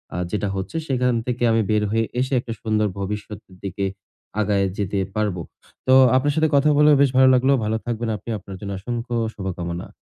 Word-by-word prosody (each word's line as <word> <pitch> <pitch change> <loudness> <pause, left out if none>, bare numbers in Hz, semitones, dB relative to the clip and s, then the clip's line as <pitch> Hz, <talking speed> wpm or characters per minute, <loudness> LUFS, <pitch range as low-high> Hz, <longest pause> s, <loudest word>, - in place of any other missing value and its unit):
আ - - -2
যেটা 105 -1 -1
হচ্ছে, 95 +11 -4
সেখান 125 -2 +1
থেকে 125 -1 -2
আমি 115 0 +3
বের 105 -1 +2
হয়ে 115 +1 +1
এসে 130 +2 -1
একটা 120 -1 -5
সুন্দর 110 -1 +1
ভবিষ্যতের 105 -1 -6
দিকে 100 0 -3 0.6
আগায় 100 -1 +1
যেতে 100 0 -2 0.2
পারবো। 105 -5 -1 0.5
তো 130 - +5 0.2
আপনার 145 +2 +1
সাথে 160 0 +2
কথা 140 +2 +4
বলেও 150 0 +6
বেশ 140 - +5
ভালো 130 0 +7
লাগলো। 130 +2 +3
ভালো 110 +1 0
থাকবেন 120 -1 -2
আপনি। 105 - -11
আপনার 95 0 -10
জন্য 100 -1 -6
অসংখ্য 120 +3 -4 0.2
শুভকামনা। 90 -3 -5
110 Hz, 185 wpm, -22 LUFS, 100-125 Hz, 0.6 s, ভালো